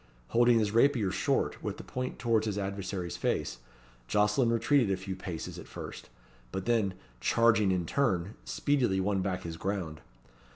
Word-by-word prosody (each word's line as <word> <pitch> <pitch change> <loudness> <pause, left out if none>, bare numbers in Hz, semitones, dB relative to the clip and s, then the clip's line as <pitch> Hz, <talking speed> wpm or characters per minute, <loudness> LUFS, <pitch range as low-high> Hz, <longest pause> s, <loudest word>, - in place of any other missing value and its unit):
Holding 120 0 +5
his 105 -2 +1
rapier 115 -4 +3
short, 95 - 0
with - - -4
the - - -8
point 130 0 -4
towards 110 0 +1
his 105 -1 -1
adversary's 95 -3 -3
face, - - -1 0.5
Jocelyn 105 - +3
retreated 115 +1 +3
a 95 - +1
few 95 0 -5
paces 90 -3 -6
at - - -10
first, - - -8 0.4
but 95 0 -4
then, 110 -6 +1 0.2
charging 110 - +4
in 90 -2 0
turn, 100 -6 0
speedily 95 - +1
won 95 0 +1
back 90 -1 -2
his 80 -1 -5
ground. 90 -6 -3
100 Hz, 160 wpm, -30 LUFS, 95-115 Hz, 0.5 s, Holding